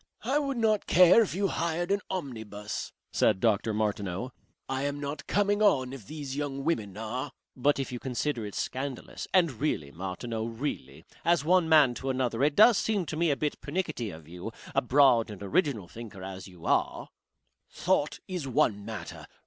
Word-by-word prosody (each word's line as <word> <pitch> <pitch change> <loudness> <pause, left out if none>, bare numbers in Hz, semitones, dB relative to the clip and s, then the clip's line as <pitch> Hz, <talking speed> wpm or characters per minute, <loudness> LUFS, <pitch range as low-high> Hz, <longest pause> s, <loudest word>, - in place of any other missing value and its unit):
I 265 +6 +2
would 275 -3 -2
not 220 -3 +2
care 180 +5 +7
if 205 - -1
you 195 +1 +1
hired 170 +1 -1
an 200 0 +2
omnibus, 110 - -5 0.2
said 100 -3 +3
Dr. 110 0 +2
Martineau. 105 +1 -2 0.4
"I 135 0 -2
am 145 +1 -2
not 140 0 -5
coming 205 +1 +2
on 135 -11 +3
if 130 -7 -10
these 145 -2 -6
young 140 -1 -3
women 105 - -1
are." 125 +5 -4 0.2
"But 145 +3 +2
if 135 -2 -3
you 125 - -4
consider 125 0 -2
it 105 -1 -6
scandalous 135 0 -4
and 175 -5 +4
really, 110 - -2
Martineau, 95 - -4
really! 115 - -5 0.2
as 170 -3 +2
one 175 -1 +4
man 150 -6 +6
to 135 +2 -4
another, 130 -2 0
it 145 0 +3
does 215 0 +7
seem 205 -5 0
to 155 - -4
me 170 +2 +2
to - - +2
be - - +4
a - - -4
bit - - -21
pernickety 155 - -2
of 80 -4 -11
you, 90 +6 -7 0.2
a - - +3
broad 125 -3 +4
and 100 -2 -8
original 135 - 0
thinker 105 -2 -9
as 95 0 -7
you 90 -3 -13
are - - 0 0.3
" - - -53 0.2
"Thought 160 -5 0
is 180 -7 -4
one 105 -5 +1
matter. 105 -5 -7
135 Hz, 190 wpm, -29 LUFS, 110-165 Hz, 0.4 s, care